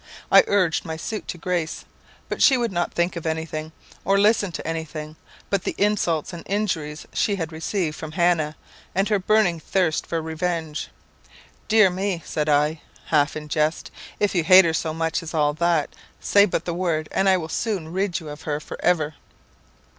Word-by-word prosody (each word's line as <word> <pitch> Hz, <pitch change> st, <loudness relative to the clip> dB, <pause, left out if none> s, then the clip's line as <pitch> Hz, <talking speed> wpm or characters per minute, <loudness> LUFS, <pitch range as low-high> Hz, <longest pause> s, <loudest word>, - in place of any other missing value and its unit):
I -, -, +8 dB
urged 185 Hz, -5 st, +2 dB
my 160 Hz, -2 st, -5 dB
suit 215 Hz, +6 st, -5 dB
to 175 Hz, -, -5 dB
Grace; 175 Hz, -2 st, -2 dB, 0.4 s
but -, -, -4 dB
she 270 Hz, -, +6 dB
would 235 Hz, -3 st, -1 dB
not 175 Hz, -1 st, -1 dB
think 175 Hz, +1 st, 0 dB
of 165 Hz, -1 st, -4 dB
anything, 160 Hz, -1 st, -3 dB, 0.3 s
or 195 Hz, +1 st, +3 dB
listen 205 Hz, -2 st, +3 dB
to -, -, -6 dB
anything, 155 Hz, -1 st, -5 dB, 0.4 s
but 200 Hz, -2 st, +2 dB
the -, -, -3 dB
insults 185 Hz, -6 st, 0 dB
and 170 Hz, -, -7 dB
injuries 165 Hz, -7 st, -2 dB
she 205 Hz, -, +1 dB
had 165 Hz, -4 st, -4 dB
received 160 Hz, 0 st, -2 dB
from 155 Hz, 0 st, -7 dB
Hannah, 170 Hz, -3 st, +2 dB, 0.4 s
and 195 Hz, +2 st, +2 dB
her 210 Hz, -2 st, +2 dB
burning 190 Hz, -3 st, +2 dB
thirst 170 Hz, -1 st, 0 dB
for 165 Hz, -, -1 dB
revenge. 160 Hz, -1 st, -3 dB, 0.8 s
'Dear 215 Hz, -4 st, +5 dB
me,' 185 Hz, -2 st, -2 dB
said 150 Hz, 0 st, -2 dB
I, 150 Hz, +2 st, +2 dB, 0.3 s
half 150 Hz, -1 st, +2 dB
in 150 Hz, 0 st, -7 dB
jest, 155 Hz, +1 st, -1 dB, 0.3 s
'if 205 Hz, -, +1 dB
you 175 Hz, -3 st, +2 dB
hate 185 Hz, +2 st, +8 dB
her 165 Hz, -, +1 dB
so 160 Hz, 0 st, -1 dB
much 165 Hz, 0 st, -1 dB
as 165 Hz, 0 st, -7 dB
all 150 Hz, -1 st, +2 dB
that, 170 Hz, -1 st, +1 dB, 0.3 s
say 200 Hz, 0 st, +5 dB
but 195 Hz, -, -2 dB
the 170 Hz, -, -2 dB
word, 165 Hz, -3 st, -1 dB
and 195 Hz, 0 st, +2 dB
I 190 Hz, -, +5 dB
will 160 Hz, -3 st, -4 dB
soon 175 Hz, -3 st, -3 dB
rid 190 Hz, -1 st, 0 dB
you 160 Hz, -3 st, -9 dB
of 150 Hz, 0 st, -8 dB
her 150 Hz, -1 st, -2 dB
for -, -, -9 dB
ever.' 160 Hz, -4 st, +2 dB
165 Hz, 190 wpm, -23 LUFS, 155-190 Hz, 0.8 s, I